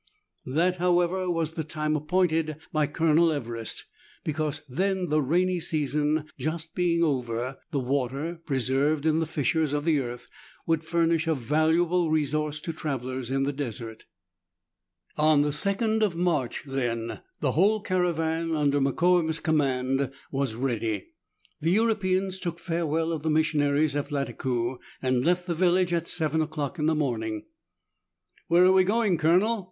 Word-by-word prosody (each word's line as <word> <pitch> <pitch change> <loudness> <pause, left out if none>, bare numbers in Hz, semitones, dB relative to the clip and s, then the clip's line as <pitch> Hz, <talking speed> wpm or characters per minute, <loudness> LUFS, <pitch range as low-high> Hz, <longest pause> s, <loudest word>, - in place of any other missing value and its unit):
That, 170 +7 +1
however, 180 +1 +1
was 165 -2 0
the 160 - -3
time 155 0 -1
appointed 160 -1 +1 0.2
by 155 -2 +2
Colonel 160 +2 +3
Everest; 115 -6 -4 0.4
because 155 -1 -2
then 185 +6 -1
the 155 0 +2
rainy 180 +6 +1
season 150 -1 0 0.2
just 160 +1 -4
being 170 -1 +1
over, 125 -3 -1
the 145 -4 -1
water, 140 +6 -2
preserved 140 +2 +1
in 160 0 +3
the 160 - -1
fissures 155 0 0
of 145 0 -1
the 160 -3 +3
earth, 120 -1 -6 0.4
would 165 -1 +1
furnish 165 0 +1
a 160 - +2
valuable 160 +6 +2
resource 150 0 0
to 165 -1 -4
travellers 130 -5 -4
in 135 +1 0
the 140 +1 -1
desert. 115 -5 -6 1.1
On 150 -1 +4
the 145 - 0
2nd 200 +8 0
of 205 -6 +1
March, 165 -8 0
then, 120 -4 -3 0.2
the 140 - +1
whole 200 +9 +3
caravan, 165 -4 0
under 145 -2 +2
Mokoum's 165 +3 +2
command, 135 -3 0 0.2
was 135 -5 -1
ready. 115 -5 -2 0.5
The 160 - 0
Europeans 190 -2 +1
took 170 -2 -4
farewell 165 -2 -1
of 160 -3 -3
the 160 - -1
missionaries 150 -1 +2
at 145 0 -2
Lattakoo, 130 -3 -2 0.2
and 130 -1 +1
left 180 +2 +1
the 175 - -1
village 180 +1 +2
at 170 -1 0
seven 160 -1 +1
o'clock 155 +1 -3
in 150 - +1
the 160 - +2
morning. 110 -7 -2 1.0
"Where 175 +2 +5
are 185 - +6
we 190 0 +6
going. 205 -3 +1
Colonel 185 +8 +3
155 Hz, 150 wpm, -27 LUFS, 140-170 Hz, 1.1 s, are